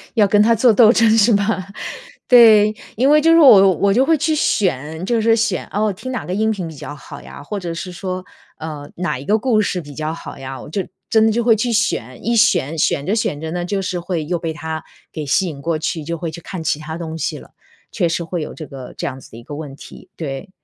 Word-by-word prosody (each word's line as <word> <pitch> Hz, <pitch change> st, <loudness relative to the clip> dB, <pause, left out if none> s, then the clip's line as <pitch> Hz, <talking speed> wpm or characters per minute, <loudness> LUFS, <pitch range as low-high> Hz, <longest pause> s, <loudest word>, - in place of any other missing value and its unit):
要 210 Hz, -4 st, +4 dB
跟 205 Hz, +1 st, +4 dB
它 230 Hz, +2 st, +4 dB
做 235 Hz, +1 st, +4 dB
斗 225 Hz, 0 st, +7 dB
争 230 Hz, -1 st, +4 dB
是 220 Hz, +1 st, +5 dB
吧？ 200 Hz, -2 st, 0 dB, 0.6 s
对， 215 Hz, -4 st, +7 dB, 0.2 s
因 260 Hz, +5 st, +2 dB
为 300 Hz, +1 st, +6 dB
就 330 Hz, +1 st, +4 dB
是 330 Hz, -, +6 dB
我 195 Hz, -, +8 dB
我 200 Hz, -1 st, +2 dB
就 260 Hz, +4 st, +3 dB
会 320 Hz, -1 st, +3 dB
去 310 Hz, +2 st, 0 dB
选 160 Hz, -, -1 dB
就 235 Hz, +1 st, +1 dB
是 225 Hz, 0 st, +4 dB
选， 220 Hz, -5 st, -1 dB
哦， 210 Hz, 0 st, 0 dB
听 225 Hz, +7 st, -7 dB
哪 250 Hz, -, -4 dB
个 180 Hz, -, -4 dB
音 220 Hz, +2 st, +1 dB
频 190 Hz, -6 st, -4 dB
比 160 Hz, -, -9 dB
较 145 Hz, +1 st, -8 dB
好 145 Hz, -1 st, -11 dB
呀， -, -, -11 dB
或 205 Hz, +7 st, -5 dB
者 170 Hz, -2 st, -5 dB
是 180 Hz, +2 st, -6 dB
说， 185 Hz, +1 st, -5 dB, 0.3 s
呃， 150 Hz, -2 st, -7 dB
哪 175 Hz, -6 st, -2 dB
一 140 Hz, -, -10 dB
个 215 Hz, +6 st, +3 dB
故 225 Hz, -2 st, +2 dB
事 180 Hz, -3 st, -2 dB
比 145 Hz, -1 st, -11 dB
较 155 Hz, 0 st, -3 dB
好 165 Hz, -, -9 dB
呀， 135 Hz, 0 st, -7 dB
我 -, -, -10 dB
就 190 Hz, +3 st, -3 dB, 0.2 s
真 220 Hz, -1 st, +4 dB
的 220 Hz, -, +3 dB
就 235 Hz, +2 st, 0 dB
会 225 Hz, -2 st, +5 dB
去 235 Hz, +3 st, -1 dB
选， 130 Hz, -, -1 dB
一 235 Hz, +1 st, +1 dB
选 165 Hz, -7 st, +2 dB
选 145 Hz, -1 st, +1 dB
着 205 Hz, -, 0 dB
选 155 Hz, -9 st, -2 dB
着 160 Hz, -, -5 dB
呢 175 Hz, +1 st, -3 dB
就 195 Hz, +1 st, -2 dB
是 180 Hz, -1 st, -3 dB
会 170 Hz, -3 st, -3 dB
又 175 Hz, +3 st, -1 dB
被 165 Hz, -1 st, -3 dB
它 160 Hz, 0 st, -5 dB, 0.3 s
给 155 Hz, -2 st, -5 dB
吸 180 Hz, +7 st, +1 dB
引 140 Hz, -4 st, -7 dB
过 165 Hz, 0 st, -1 dB
去， 160 Hz, 0 st, -3 dB
就 170 Hz, +2 st, -4 dB
会 165 Hz, -1 st, -4 dB
去 170 Hz, -, -8 dB
看 185 Hz, -4 st, -7 dB
其 155 Hz, -, 0 dB
它 160 Hz, +1 st, -6 dB
东 160 Hz, -1 st, -6 dB
西 -, -, -3 dB
了， -, -, -16 dB, 0.4 s
确 175 Hz, -5 st, 0 dB
实 165 Hz, +1 st, -2 dB
会 170 Hz, 0 st, -4 dB
有 -, -, -6 dB
这 155 Hz, -, -9 dB
个 130 Hz, -3 st, -10 dB
这 -, -, -4 dB
样 135 Hz, -1 st, -6 dB
子 -, -, -16 dB
的 115 Hz, -, -11 dB
一 120 Hz, -, -12 dB
个 145 Hz, -, -8 dB
问 145 Hz, -3 st, -7 dB
题， -, -, -14 dB
对。 140 Hz, +3 st, -6 dB
180 Hz, 280 characters per minute, -19 LUFS, 155-220 Hz, 0.6 s, 我